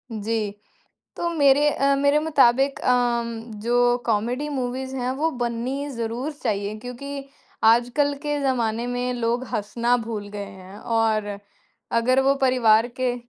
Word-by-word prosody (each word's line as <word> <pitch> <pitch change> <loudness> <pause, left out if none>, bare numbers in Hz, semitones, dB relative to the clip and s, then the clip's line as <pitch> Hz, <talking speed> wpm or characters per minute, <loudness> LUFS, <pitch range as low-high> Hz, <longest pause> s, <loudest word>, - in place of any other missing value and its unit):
जी, 220 -1 -2 0.7
तो 345 - -1
मेरे 290 -1 +5
अ, 275 +1 +2
मेरे 285 +1 +3
मुताबिक 275 -3 +3
अम, 235 -2 +1 0.2
जो 245 +2 +3
कॉमेडी 240 +6 0
मूवीज़ 260 -1 -3
हैं, 250 0 -1
वो 300 +5 0
बननी 245 +4 -2
ज़रूर 235 +4 -3
चाहिए 210 -7 -2
क्योंकि 275 +4 -7 0.4
आजकल 245 +6 +3
के 295 -1 -1
ज़माने 235 -3 0
में 245 0 -2
लोग 240 +1 -1
हँसना 235 +4 +1
भूल 210 -3 -5
गए 205 0 -6
हैं। 190 +1 -12
और 220 -3 0 0.6
अगर 255 +3 +3
वो 275 +1 +3
परिवार 230 -3 +4
के 250 -1 +1
245 Hz, 135 wpm, -23 LUFS, 225-270 Hz, 0.7 s, मेरे